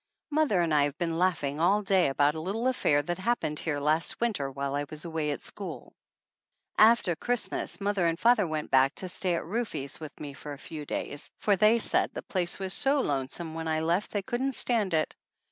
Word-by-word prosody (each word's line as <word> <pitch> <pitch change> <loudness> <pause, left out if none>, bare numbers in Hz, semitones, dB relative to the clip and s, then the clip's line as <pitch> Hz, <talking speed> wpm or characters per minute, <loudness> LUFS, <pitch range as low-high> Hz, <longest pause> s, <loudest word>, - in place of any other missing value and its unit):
Mother 290 - +2
and 165 -2 +1
I 145 -1 +4
have 145 +1 -4
been 165 -1 -2
laughing 155 -6 0
all 200 +5 +3
day 195 -4 +3
about 145 +2 +2
a 160 - -5
little 205 +8 -3
affair 145 - +2
that 175 +4 -3
happened 185 -8 -1
here 150 -3 -2
last 155 +3 +1
winter 210 -13 -1
while 140 +1 -4
I 145 0 -1
was 155 +1 -7
away 160 -2 -2
at 145 - -3
school. - - -7 0.8
After 215 -5 +5
Christmas 245 +5 -2
mother 200 -3 +1
and 165 +1 -1
father 230 -5 +4
went 155 -1 -4
back 135 +1 +4
to 185 - -1
stay 180 -1 0
at - - -3
Rufe's 165 - -3
with 155 -1 -9
me 145 -2 -7
a 145 -1 -6
few 150 0 -8
days, 145 - -3
for 205 - +2
they 215 +4 +5
said 230 - +1
the - - -5
place 180 -3 -1
was 190 -1 -1
so 280 +1 +3
lonesome 145 - -2
when 165 0 -4
I 155 0 0
left 170 +5 0
they 205 -2 -2
couldn't 260 +5 -1
stand 215 -9 +3
it. 155 - 0
170 Hz, 210 wpm, -28 LUFS, 150-205 Hz, 0.8 s, After